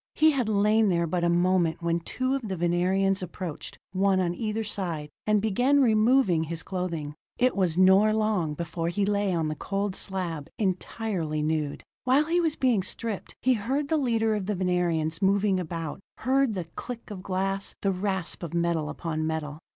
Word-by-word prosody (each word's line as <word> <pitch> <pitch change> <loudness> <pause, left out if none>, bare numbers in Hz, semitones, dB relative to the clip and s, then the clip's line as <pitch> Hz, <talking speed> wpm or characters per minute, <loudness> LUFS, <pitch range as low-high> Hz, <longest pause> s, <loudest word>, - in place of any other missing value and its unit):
He 315 0 +5
had 255 -6 0
lain 210 +1 +3
there 170 -2 +2
but 170 +1 -1
a 170 - +3
moment 175 -1 +2
when 170 0 +1
two 255 +10 -2
of 275 - 0
the 190 -2 -3
Venerians 185 +3 +1
approached, 175 -2 -6
one 190 0 +2
on 175 -2 +1
either 215 +3 -2
side, 170 -8 -4 0.2
and 210 0 +4
began 245 +7 +2
removing 220 - +4
his 165 +1 -4
clothing. 170 -6 -3 0.2
It 255 +1 +2
was 180 -4 +1
not 190 +3 +5
long 210 -8 0
before 165 +1 -3
he 195 +3 0
lay 205 -1 +1
on 165 -3 0
the 155 - -1
cold 195 +5 -2
slab, 175 -7 -4
entirely 185 -5 -2
nude. 155 -2 -1 0.2
While 265 +4 +3
he 345 +2 +2
was 320 -2 +1
being 245 -6 +2
stripped, 215 +2 -4
he 255 - +4
heard 265 +6 -1
the 320 - +2
leader 225 -5 +1
of 205 -3 -2
the 210 - 0
Venerians 175 -3 0
moving 195 0 +3
about, 165 -3 -4 0.2
heard 265 -3 +1
the 180 -3 -3
click 240 -3 -7
of 195 -3 -6
glass, 195 +1 -2
the 195 - +3
rasp 190 -2 -2
of 170 -1 -5
metal 170 -3 0
upon 155 -1 -3
metal. 155 -2 -3
190 Hz, 180 wpm, -27 LUFS, 170-215 Hz, 0.2 s, He